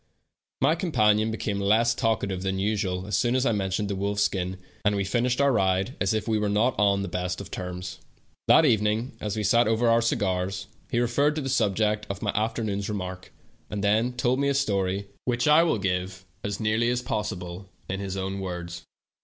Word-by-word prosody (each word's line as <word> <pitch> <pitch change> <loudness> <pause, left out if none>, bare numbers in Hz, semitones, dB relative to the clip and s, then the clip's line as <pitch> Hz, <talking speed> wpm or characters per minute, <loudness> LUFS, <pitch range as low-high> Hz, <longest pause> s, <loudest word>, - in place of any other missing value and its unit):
My 140 +4 +4
companion 110 - +2
became 105 -2 -2
less 110 +4 +3
talkative 110 -6 -1
than 95 0 -1
usual 95 -2 -1
as 100 -1 -2
soon 120 +5 +2
as 130 0 +2
I 115 - +3
mentioned 100 0 -1
the 100 - -2
wolf 100 +1 -2
skin, 95 -2 0 0.3
and 105 0 +2
we 100 - 0
finished 120 +6 0
our 140 0 +4
ride 95 +1 +1
as 95 - +2
if 110 0 -1
we 110 -1 +1
were 105 -1 0
not 110 +5 +2
on 100 -1 +3
the - - -3
best 90 0 -3
of 100 - -9
terms. 90 +1 -6 0.5
That 160 - +7
evening, 110 -1 +1
as 105 0 -3
we 105 - -1
sat 115 +4 +4
over 115 +2 +2
our 115 0 +4
cigars, 95 -6 -1 0.2
he 120 -4 0
referred 140 +5 +2
to 155 - -2
the 135 - -3
subject 105 -3 +1
of 100 +1 -5
my 105 - +1
afternoon's 105 -2 -2
remark, 95 -3 -5 0.4
and 100 -1 -4
then 110 +4 +2
told 125 +1 +1
me 140 0 +2
a 140 - +1
story, 100 -6 0 0.2
which 120 +1 0
I 150 +2 +7
will 165 -8 +2
give, 95 -1 -2 0.2
as 100 0 -3
nearly 110 +2 +1
as 125 0 -1
possible, 95 -4 -4 0.2
in 95 - -3
his 95 -1 -4
own 95 +1 -3
words. 85 -2 -5
105 Hz, 205 wpm, -26 LUFS, 95-115 Hz, 0.5 s, That